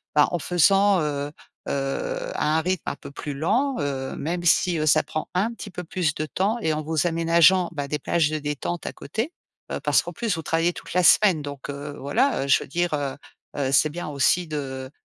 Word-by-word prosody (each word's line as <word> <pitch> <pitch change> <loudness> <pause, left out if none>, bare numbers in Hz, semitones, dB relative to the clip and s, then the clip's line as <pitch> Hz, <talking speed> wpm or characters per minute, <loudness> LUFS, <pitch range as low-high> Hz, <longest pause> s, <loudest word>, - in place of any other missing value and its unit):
bah, 150 - +6
en 175 - -1
faisant, 195 +3 +4
heu 145 -1 -2 0.4
heu, - - -2
à 155 +1 +1
un - - +2
rythme 185 +2 -1
un - - -4
peu - - -10
plus 145 0 -6
lent, 230 - +1
heu, 135 -2 -3
même 175 +4 -3
si, 175 0 +3
heu, 155 - 0
ça 155 +1 +5
prend 155 - -4
un 200 +6 +1
petit 215 - -8
peu 180 -1 -6
plus 160 -4 -1
de 155 - -2
temps 200 +8 0
et 160 - +1
en 155 - -2
vous 160 +1 0
aménageant, 170 +2 +4
bah, 145 -2 -3
des 150 - -1
plages 155 +1 +1
de 155 0 -2
détente 150 +4 -4
à - - -3
côté. 235 +10 -4 0.4
Heu, - - -2
parce - - +3
qu'en - - -7
plus 225 -7 -2
vous 160 - -4
travaillez 165 +2 +1
toute - - -10
la 180 0 +3
semaine, 180 -3 +5
donc 145 -1 -7
heu, 145 +1 -6
voilà. 140 - +1
Je - - +5
veux - - -12
dire, 175 +2 -1
heu 140 -2 -2 0.4
heu, 135 -2 0
c'est 155 +2 +4
bien 170 0 -5
aussi 150 +5 +2
de 135 -3 -5
160 Hz, 225 wpm, -24 LUFS, 145-180 Hz, 0.4 s, bah